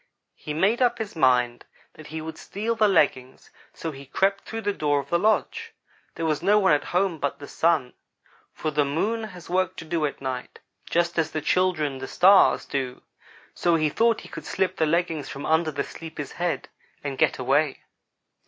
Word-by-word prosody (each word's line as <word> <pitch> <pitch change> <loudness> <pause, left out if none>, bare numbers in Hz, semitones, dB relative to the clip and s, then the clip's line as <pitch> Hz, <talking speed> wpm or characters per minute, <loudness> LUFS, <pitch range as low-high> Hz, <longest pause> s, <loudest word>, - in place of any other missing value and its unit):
He 150 - -7
made 205 +9 +2
up 245 -1 +3
his 220 -5 -5
mind 125 -4 +2 0.3
that 155 - -13
he 160 +1 -5
would 160 +1 -7
steal 220 +4 -3
the 220 -2 +3
leggings 140 -8 +1 0.2
so 165 - -5
he 140 -1 -11
crept 195 +7 0
through 225 0 -5
the 205 -1 -1
door 145 -5 +1
of 140 0 -8
the 170 - +3
lodge. 450 - 0 0.4
There 165 - -3
was 155 -2 0
no 200 +4 +4
one 190 -6 +4
at 145 - +1
home 180 -2 0
but 140 - -2
the 145 - -10
Sun, 160 -7 +1 0.6
for 155 - -3
the 150 0 +2
Moon 210 +11 -1
has 180 -5 -11
work 185 +1 0
to 165 - -8
do 160 -1 0
at 140 - -8
night 130 -2 -5 0.3
just 170 0 +1
as 160 -1 +1
the 155 - -3
children, 155 -5 +1
the 130 - -6
Stars, 190 +2 +5
do, 130 -3 -4 0.5
so 175 -1 +2
he 155 -2 +2
thought 230 +7 +2
he - - -11
could - - -9
slip 190 - -1
the 160 - +2
leggings 165 -2 0
from 140 - -6
under 160 +1 +2
the 140 -2 -2
sleeper's 160 -2 -8
head 175 -1 -2 0.4
and 140 -2 -4
get - - +3
away. 135 +3 +1
160 Hz, 200 wpm, -25 LUFS, 145-190 Hz, 0.6 s, Stars